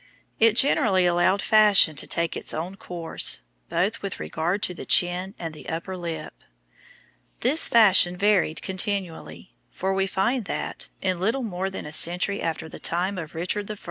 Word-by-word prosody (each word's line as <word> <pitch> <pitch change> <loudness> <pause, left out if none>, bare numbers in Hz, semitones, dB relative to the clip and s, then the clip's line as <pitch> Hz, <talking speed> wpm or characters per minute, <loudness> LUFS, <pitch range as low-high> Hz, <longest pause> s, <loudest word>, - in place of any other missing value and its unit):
It 225 -1 +5
generally 200 -8 +3
allowed 175 +3 +2
fashion 210 -7 +5
to - - -1
take 170 -1 -1
its - - -1
own 170 +4 -5
course, 170 - -1 0.3
both - - -1
with - - -6
regard 165 - -3
to 180 - 0
the - - -9
chin 180 +3 +2
and 165 -2 -6
the 155 - -10
upper 170 +4 -5
lip. 165 -3 -7 1.0
This 280 +7 +4
fashion 190 -6 +5
varied 190 -6 +1
continually; 190 -2 -5 0.2
for 190 +1 -3
we 195 0 0
find 225 +5 -1
that, - - -6
in 185 -2 0
little 225 +8 -1
more 190 -3 -3
than 190 - -7
a 150 - -8
century 180 +5 +2
after 160 -1 -3
the - - -11
time 185 +3 -2
of 160 -2 -9
Richard 185 +5 -3
I. 210 - -6
185 Hz, 170 wpm, -24 LUFS, 170-200 Hz, 1.0 s, It